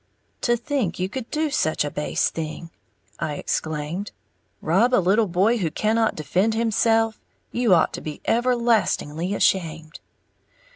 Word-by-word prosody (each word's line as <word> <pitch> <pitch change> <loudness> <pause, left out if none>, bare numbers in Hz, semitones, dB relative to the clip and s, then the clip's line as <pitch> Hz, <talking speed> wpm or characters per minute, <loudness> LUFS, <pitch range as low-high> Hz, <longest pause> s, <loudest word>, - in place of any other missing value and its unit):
"To 240 -1 +2
think 235 - -2
you 185 - -1
could 255 +2 -6
do 310 -1 -1
such 155 - +1
a 145 - -4
base 150 - 0
thing!" 165 +1 -6 0.5
I 150 - -2
exclaimed, 155 +7 -3 0.5
"Rob 220 +10 +3
a - - +4
little 200 +4 +3
boy 195 +7 +2
who 170 -5 0
cannot 220 +6 +1
defend 185 +8 0
himself. 225 0 +2 0.3
You 235 -6 +3
ought 165 - +2
to - - -5
be 150 -1 -6
everlastingly 225 -8 +1
ashamed!" 165 -5 0
200 Hz, 140 wpm, -23 LUFS, 160-230 Hz, 0.5 s, a